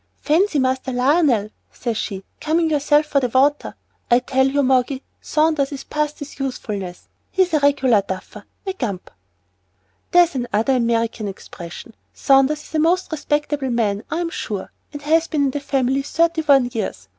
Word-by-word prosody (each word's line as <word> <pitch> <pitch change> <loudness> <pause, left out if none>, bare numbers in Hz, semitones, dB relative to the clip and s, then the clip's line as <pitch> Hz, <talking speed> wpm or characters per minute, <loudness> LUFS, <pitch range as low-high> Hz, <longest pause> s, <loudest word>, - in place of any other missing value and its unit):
'Fancy, 335 +2 +2
Master 260 0 0
Lionel,' 250 -4 +2 0.2
says 235 -2 -3
she, 195 -3 -4 0.2
'coming 320 +1 +1
yourself 295 0 +3
for 280 -2 0
'ot 250 0 -2
water!' 285 +3 +2 0.3
I 240 - +6
tell 260 +1 +1
you, 280 +1 +1
Moggy, 260 +1 +1 0.2
Saunders 305 -3 +1
is 280 - -6
past 300 0 -2
his 290 -1 -9
usefulness. 205 -9 -5 0.2
He's 370 -3 +1
a 305 - +4
regular 270 -6 +3
duffer 190 -1 -7 0.2
a 385 - -2
gump." 205 - -5 1.0
"There's 350 -2 +5
another 245 0 0
American 230 -2 0
expression. 190 +2 -9 0.2
Saunders 275 +2 +3
is - - -16
a 315 - +1
most 340 +4 +1
respectable 295 -2 -1
man, 220 -3 0
I'm 335 +2 -2
sure, 205 - -5 0.2
and 290 -1 -8
has 325 +2 +2
been 295 -2 0
in 275 - +1
the 290 - -3
family 270 -1 0
thirty 330 +3 +1
one 275 -5 +4
years. 225 - -4
275 Hz, 160 wpm, -21 LUFS, 240-300 Hz, 1.0 s, I